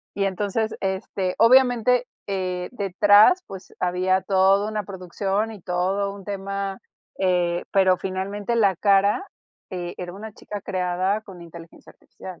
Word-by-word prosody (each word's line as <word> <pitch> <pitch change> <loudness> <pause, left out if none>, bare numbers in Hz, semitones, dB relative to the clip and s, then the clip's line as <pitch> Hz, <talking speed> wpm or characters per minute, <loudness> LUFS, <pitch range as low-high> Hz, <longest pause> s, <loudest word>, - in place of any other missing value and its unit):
Y 200 - 0
entonces, 205 +3 -1
este, 190 -1 -2
obviamente, 250 0 +4 0.2
eh, 185 -2 -3
detrás, 205 - +4
pues, 190 -1 -11
había 185 +1 +1
todo 195 +1 +3
una 215 -1 -2
producción 195 +3 -3
y 210 - -11
todo 190 +3 -1
un 200 -2 -12
tema, 195 -1 -4 0.4
eh, 175 -2 +1
pero 190 -2 +4
finalmente 200 +4 -3
la 200 -5 +3
cara, 200 - +3 0.5
eh, 175 -1 -5
era 175 -1 -6
una 215 +3 -9
chica 205 0 -8
creada 185 +2 -1
con 185 -4 -12
inteligencia 170 0 -13
artificial. 185 -2 -12
195 Hz, 135 wpm, -23 LUFS, 185-205 Hz, 0.5 s, obviamente